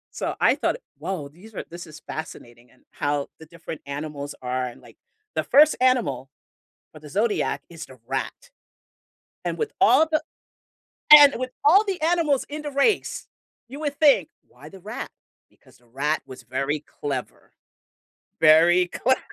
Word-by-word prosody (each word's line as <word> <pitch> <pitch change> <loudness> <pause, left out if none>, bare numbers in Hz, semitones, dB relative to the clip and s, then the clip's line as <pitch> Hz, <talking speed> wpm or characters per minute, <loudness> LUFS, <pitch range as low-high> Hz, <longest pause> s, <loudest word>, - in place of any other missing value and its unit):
So, - - -2
I - - +4
thought, - - -1 0.2
"Whoa, 175 -7 -5
these 180 +10 -17
are - - -5
this 175 +1 -9
is 155 -1 -13
fascinating," 120 -7 -9
and 130 - -28
how 145 0 -2
the 160 - -13
different 165 -1 -9
animals 145 0 -6
are 130 0 -2
and 120 -1 -9
like, - - -17 0.4
the - - -1
1st 300 +2 +5
animal 210 - +1 0.6
for 155 - -12
the 150 - -12
zodiac 210 +7 -1
is 165 -2 -9
the 130 - -16
rat. 135 - -5 0.9
And - - -3
with 450 -1 -2
all 320 - +6
the 310 0 +1 0.9
and 290 -2 +10
with 255 0 -4
all 385 +9 +6
the 380 -5 -3
animals 320 -5 +1
in 300 +1 -6
the 295 - -5
race, 280 +10 0 0.4
you 280 +3 -8
would 290 -2 -3
think, 280 - +4 0.2
"Why 135 +5 -15
the 190 +4 -13
rat?" - - -7 0.4
Because - - -24
the 120 - -29
rat 145 +6 -1
was 130 -1 -12
very 135 +5 -2
clever, 140 -3 -7 0.9
very 165 +3 +6
clever. 260 +8 0
165 Hz, 160 wpm, -24 LUFS, -, 0.9 s, and